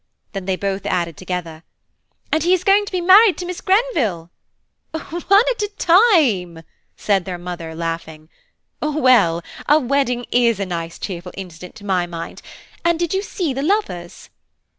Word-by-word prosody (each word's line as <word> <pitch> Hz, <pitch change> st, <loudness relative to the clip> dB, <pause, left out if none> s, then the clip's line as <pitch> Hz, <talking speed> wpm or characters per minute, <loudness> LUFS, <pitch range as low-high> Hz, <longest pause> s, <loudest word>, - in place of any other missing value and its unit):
Then 195 Hz, -2 st, -5 dB
they 190 Hz, -1 st, 0 dB
both 195 Hz, +1 st, -3 dB
added 170 Hz, -3 st, -1 dB
together, 170 Hz, -1 st, -5 dB, 0.7 s
"And 315 Hz, -, +2 dB
he 355 Hz, +4 st, +4 dB
is 365 Hz, -, -4 dB
going 405 Hz, +1 st, +4 dB
to -, -, -7 dB
be 365 Hz, -2 st, -1 dB
married 380 Hz, +3 st, +6 dB
to 360 Hz, -, -5 dB
Miss 360 Hz, 0 st, -6 dB
Grenville." 295 Hz, -, 0 dB, 0.6 s
"One 320 Hz, 0 st, -7 dB, 0.4 s
at 475 Hz, -, -4 dB
a 415 Hz, -, -1 dB
time," 285 Hz, -, +3 dB, 0.3 s
said 195 Hz, -3 st, +1 dB
their 180 Hz, -1 st, -5 dB
mother 175 Hz, -2 st, -7 dB
laughing. 165 Hz, -2 st, -5 dB, 0.5 s
"Well, 255 Hz, -, +3 dB, 0.3 s
a 300 Hz, -, +7 dB
wedding 250 Hz, -3 st, 0 dB
is 235 Hz, -4 st, +3 dB
a 195 Hz, -, -1 dB
nice 170 Hz, -2 st, -5 dB
cheerful 180 Hz, -2 st, -6 dB
incident 180 Hz, -1 st, -9 dB
to 210 Hz, -2 st, -12 dB
my 185 Hz, -3 st, 0 dB
mind–and 175 Hz, -, -5 dB
did 345 Hz, 0 st, -1 dB
you 385 Hz, -, +1 dB
see 355 Hz, -7 st, -3 dB
the 270 Hz, -, -3 dB
lovers?" 290 Hz, -, -2 dB
205 Hz, 160 wpm, -20 LUFS, -, 0.7 s, a